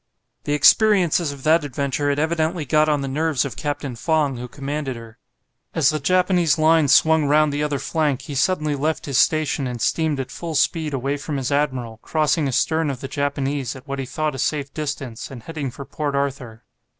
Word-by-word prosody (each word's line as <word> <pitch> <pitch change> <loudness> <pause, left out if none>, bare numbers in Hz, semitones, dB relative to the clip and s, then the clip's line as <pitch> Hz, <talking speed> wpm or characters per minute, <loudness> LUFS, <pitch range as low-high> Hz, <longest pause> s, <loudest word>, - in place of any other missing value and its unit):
The 145 - 0
experiences 175 0 +4
of 140 -2 -10
that 160 +1 +4
adventure 140 +1 -2
had 140 - 0
evidently 160 +1 0
got 155 +2 +3
on 145 -2 +1
the 135 - -3
nerves 150 0 0
of 140 - -5
Captain 145 -3 -4
Fong, 145 0 0
who 125 +1 -6
commanded 140 +1 -4
her. 115 0 -12 0.6
As 155 -3 +4
the 155 - -2
Japanese 180 0 +2
line 160 -1 +4
swung 160 +2 +4
round 150 +1 +3
the 145 - -1
other 150 -1 0
flank, 145 -3 -1
he 145 - -7
suddenly 150 +1 +1
left 155 +3 -2
his 140 -4 +1
station 155 -3 +2
and 125 -1 -5
steamed 155 +4 0
at 130 - -4
full 165 -2 -5
speed 150 +1 +1
away 135 +2 -2
from 145 0 -4
his 135 0 -3
admiral, 130 -6 -1
crossing 155 -1 +1
astern 160 +4 +1
of 135 -3 -4
the 135 - -6
Japanese, 140 -2 -2
at 130 +2 -13
what 140 0 -4
he 135 - -4
thought 155 +3 -2
a 135 - -7
safe 140 0 -2
distance, 140 -6 -5
and 125 -4 -10
heading 150 -2 -4
for 135 +3 -9
Port 145 +1 -3
Arthur. 135 -5 -3
145 Hz, 200 wpm, -22 LUFS, 135-155 Hz, 0.6 s, experiences